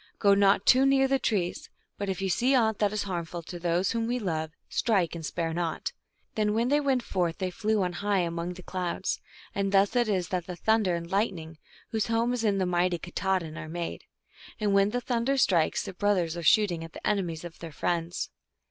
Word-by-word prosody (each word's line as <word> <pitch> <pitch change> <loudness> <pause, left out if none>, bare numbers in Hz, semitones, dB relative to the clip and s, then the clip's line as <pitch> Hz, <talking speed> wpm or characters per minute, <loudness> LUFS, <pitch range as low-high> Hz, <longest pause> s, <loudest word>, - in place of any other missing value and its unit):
Go 200 -2 +5
not 200 0 +4
too 260 +1 +6
near 270 0 +4
the 270 0 +2
trees, 185 -8 -1 0.3
but 200 -1 -2
if 190 0 -2
you 190 - 0
see 250 +9 +3
aught 220 -4 +2
that 205 -2 +2
is 210 -1 -1
harmful 175 -3 -4
to 175 +2 -8
those 175 +2 +1
whom 230 0 -1
we 245 +1 0
love, 160 -8 -2 0.2
strike, 200 -7 +1
and 170 -1 -6
spare 165 +1 -2
not! 170 - -2 0.2
" - - -45
Then 210 -1 +1
when 235 +2 +1
they 290 +1 +4
went 270 -4 +1
forth 175 -5 -1
they 185 -2 -2
flew 215 +2 0
on 180 -1 -2
high, 200 +1 +1
among 170 +1 -3
the 185 - -11
clouds: 185 +1 -2 0.3
and 195 -1 -1
thus 200 +3 +3
it 240 -2 +2
is 185 -4 0
that 180 -4 -2
the 180 - -5
Thunder 215 -1 +2
and 170 +1 -6
Lightning, 170 -6 -1 0.3
whose 220 -2 0
home 230 +1 +1
is 245 -2 -2
in 205 -3 +2
the 190 - +1
mighty 180 0 +1
Katah 185 +2 -1
din, 160 0 -7
are 160 -2 -7
made. 170 +1 -5 0.5
And 210 -2 +1
when 200 0 +4
the 245 +3 -2
thunder 245 +2 0
strikes, 180 -10 +2
the 195 - -6
brothers 180 -4 +1
are 170 - -4
shooting 175 -1 +3
at 165 - -10
the - - -5
enemies 175 -6 -1
of 170 -1 -9
their 165 -1 -7
friends. 170 +2 -2
190 Hz, 225 wpm, -28 LUFS, 175-215 Hz, 0.5 s, too